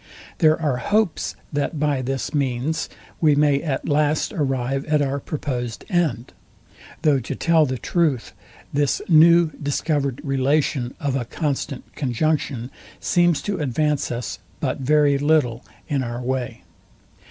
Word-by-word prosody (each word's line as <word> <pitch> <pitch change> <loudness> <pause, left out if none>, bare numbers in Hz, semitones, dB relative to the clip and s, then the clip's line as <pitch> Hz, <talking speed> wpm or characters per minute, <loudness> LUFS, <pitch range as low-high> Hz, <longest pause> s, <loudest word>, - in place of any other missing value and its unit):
There 155 -2 +4
are 145 -6 0
hopes, 205 - 0 0.2
that 145 +2 -1
by 145 -3 +1
this 130 +1 -3
means 140 +3 -1 0.3
we 155 -3 +4
may 145 -1 +3
at 140 -5 -3
last 150 +5 +1
arrive 135 -4 -1
at 150 -1 +2
our 140 0 0
proposed 125 -6 -4
end; 155 -10 0 0.7
though 150 -4 +4
to 125 - -5
tell 165 -3 +3
the 130 0 -2
truth, 150 -1 0 0.4
this 145 -1 +1
new 170 0 +6
discovered 145 -2 -1
relation 135 -2 0
of 140 -2 -1
a 125 -3 -1
constant 140 0 -3
conjunction 135 -2 -1 0.3
seems 175 -3 +2
to 205 - -2
advance 150 +1 0
us 120 -1 -4 0.2
but - - -2
very 145 +1 +3
little 145 -6 +2 0.2
in 140 -2 0
our 120 -1 -4
way. 125 -5 -3
145 Hz, 135 wpm, -22 LUFS, 130-155 Hz, 0.7 s, new